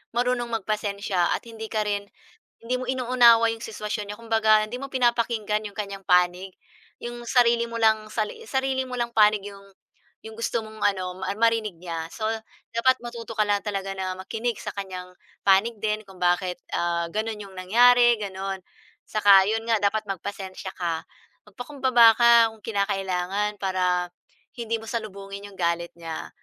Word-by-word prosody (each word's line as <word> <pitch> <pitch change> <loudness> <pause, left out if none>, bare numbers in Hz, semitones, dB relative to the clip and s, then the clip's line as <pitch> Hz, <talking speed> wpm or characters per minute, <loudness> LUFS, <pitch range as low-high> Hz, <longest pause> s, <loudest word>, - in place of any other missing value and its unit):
marunong 245 0 +1 0.2
magpasensya 200 -4 0
at - - -6
hindi 225 -1 -7
ka 215 -1 -1
rin 205 -1 -2 0.6
hindi 250 +2 -1
mo 255 - -4
inuunawa 240 -2 +5
'yong 225 - -12
sitwasyon 210 -1 -4
nyo. - - -8
Kumbaga 220 -2 +3
hindi 240 +3 -6
mo 275 0 -7
pinapakinggan 235 -4 +1
'yong 205 - -10
kanyang 200 -1 -5
panig. 180 +1 +3 0.5
'Yong 240 0 -6
sarili 235 -1 +3
mo 230 - -4
lang, 220 -1 +2
sali 215 - -3
sarili 265 0 0
mo 250 -1 -5
lang 235 0 -1
panig 210 -1 +4
'yong 200 -1 -11 0.6
'yong 220 0 -10
gusto 230 0 -1
mong 220 -1 -7
ano 185 -2 0
ma - - -1
marinig 225 -3 +2
niya. 165 -2 -4
So 215 -1 -3 0.5
dapat 260 +2 +3
matuto 235 -1 -7
ka 215 -1 +1
lang 205 +1 +1
talaga 195 -2 -3
na 185 -1 -2
makinig 225 +4 -3
sa - - -6
kanyang 185 -2 -6 0.3
panig 200 +4 +3
din 215 0 -1
kung 190 -2 -16
bakit 180 0 +1 0.2
ah, 170 -1 0
gano'n 215 +2 -3
'yong 195 -2 -10
nangyari, 240 +4 +5
gano'n. 195 -1 -4 0.5
Saka 200 -2 +6
'yon 225 +1 -1
nga 225 -2 +1
dapat 210 +1 +1
magpasensiya 190 0 -6
ka, 170 -3 -2 0.5
magpakumbaba 245 0 +4
ka 235 0 +7 0.2
kung 220 - -17
kinakailangan, 200 -1 -1
para 180 -2 0 0.4
hindi 230 -1 -2
mo 225 - -9
salubungin 200 -3 -6
'yong 195 - -15
galit 170 0 0
niya. 165 -1 -6
210 Hz, 165 wpm, -25 LUFS, 195-230 Hz, 0.6 s, ka